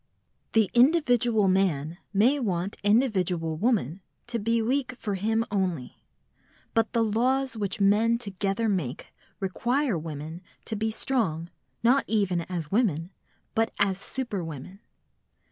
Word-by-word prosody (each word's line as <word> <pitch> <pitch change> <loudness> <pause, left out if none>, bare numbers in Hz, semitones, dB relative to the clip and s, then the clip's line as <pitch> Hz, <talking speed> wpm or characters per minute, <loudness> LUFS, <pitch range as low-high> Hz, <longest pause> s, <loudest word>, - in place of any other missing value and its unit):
The 220 -3 +3
individual 245 - +4
man 175 -4 +1
may 235 +8 +3
want 190 -5 -1
individual 190 -7 +1
woman 195 - 0 0.2
to 240 -1 -3
be 230 +2 +1
weak 250 +3 0
for 210 -4 -4
him 220 +4 0
only, 180 -10 -2 0.7
but 225 -1 +1
the 230 - +3
laws 255 +4 +1
which 205 -3 -3
men 215 +4 +4
together 200 0 -2
make 170 - -2 0.3
require 235 - 0
women 155 +2 -7 0.2
to 220 - -3
be 220 +1 -1
strong, 195 -9 -1 0.3
not 255 +4 +4
even 195 -5 +1
as 170 -5 -4
women, 185 -6 +1 0.4
but 225 0 +1
as 195 -2 +2
superwomen. 190 - -5
205 Hz, 125 wpm, -27 LUFS, 180-230 Hz, 0.7 s, individual